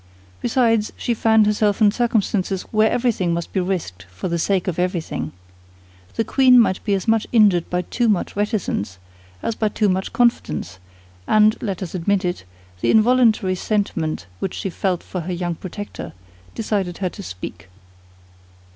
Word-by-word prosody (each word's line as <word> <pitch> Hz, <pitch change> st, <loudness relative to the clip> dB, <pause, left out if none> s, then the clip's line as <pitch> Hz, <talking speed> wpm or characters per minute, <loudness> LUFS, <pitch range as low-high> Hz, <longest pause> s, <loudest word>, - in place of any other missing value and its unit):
Besides, 230 Hz, -3 st, +2 dB
she 240 Hz, -, -1 dB
found 220 Hz, -1 st, +4 dB
herself 210 Hz, -1 st, +1 dB
in 210 Hz, -2 st, +5 dB
circumstances 205 Hz, -5 st, 0 dB
where 220 Hz, 0 st, +4 dB
everything 220 Hz, -9 st, 0 dB
must 170 Hz, 0 st, -5 dB
be 190 Hz, -, +1 dB
risked 165 Hz, -, -3 dB
for 95 Hz, -, -5 dB
the 170 Hz, 0 st, -1 dB
sake 190 Hz, +2 st, 0 dB
of 180 Hz, -2 st, -2 dB
everything. 170 Hz, -, -2 dB, 0.8 s
The 225 Hz, -, +1 dB
queen 255 Hz, 0 st, +5 dB
might 190 Hz, -5 st, +2 dB
be 205 Hz, -2 st, +1 dB
as 190 Hz, -, -4 dB
much 225 Hz, -1 st, +2 dB
injured 205 Hz, -7 st, +4 dB
by 180 Hz, 0 st, -1 dB
too 235 Hz, +6 st, 0 dB
much 200 Hz, -4 st, 0 dB
reticence 205 Hz, -, -2 dB, 0.5 s
as 230 Hz, -, 0 dB
by 215 Hz, -1 st, 0 dB
too 210 Hz, -1 st, +1 dB
much 190 Hz, +1 st, -1 dB
confidence; 90 Hz, -, 0 dB, 0.5 s
and—let 215 Hz, -3 st, +2 dB
us 175 Hz, -, -7 dB
admit 190 Hz, +2 st, 0 dB
it—the 90 Hz, -, -5 dB
involuntary 220 Hz, -4 st, +4 dB
sentiment 185 Hz, -5 st, -2 dB
which 190 Hz, -, -3 dB
she 195 Hz, -, -3 dB
felt 180 Hz, -1 st, -1 dB
for 180 Hz, -, -5 dB
her 180 Hz, +2 st, -4 dB
young 175 Hz, 0 st, -2 dB
protector 190 Hz, +5 st, -7 dB, 0.4 s
decided 195 Hz, -5 st, -2 dB
her 185 Hz, -2 st, -1 dB
to 200 Hz, -, -10 dB
speak. 90 Hz, -, -8 dB
195 Hz, 155 wpm, -21 LUFS, 175-220 Hz, 0.8 s, in